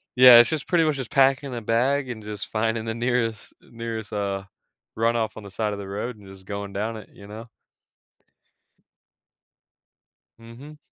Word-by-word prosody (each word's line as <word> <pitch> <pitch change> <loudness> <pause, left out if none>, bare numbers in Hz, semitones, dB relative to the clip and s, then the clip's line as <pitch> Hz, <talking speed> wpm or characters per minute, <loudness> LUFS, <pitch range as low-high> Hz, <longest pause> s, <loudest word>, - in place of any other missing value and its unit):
yeah, 125 -1 +10
it's 120 - +5
just 155 -3 -3
pretty 170 -2 +3
much 155 -3 +1
just 130 -4 -6
packing 135 -1 +2
a 120 - -4
bag 130 +5 +1
and 110 -3 -7
just 105 -1 -6
finding 110 +1 -1
the 110 - -3
nearest 115 -2 -1
nearest, 115 -2 -7
uh, 100 -1 -2 0.5
runoff 115 -1 0
on 110 - -9
the 100 - -11
side 105 0 -2
of 100 - -6
the 100 - -7
road 105 +4 -5
and 100 - -16
just 95 -1 -14
going 100 0 -6
down 110 +3 -3
it, 105 - -12
you 100 - -14
know? 110 +2 -9 2.9
Mhm. 125 +7 -13
115 Hz, 170 wpm, -24 LUFS, 105-125 Hz, 2.9 s, yeah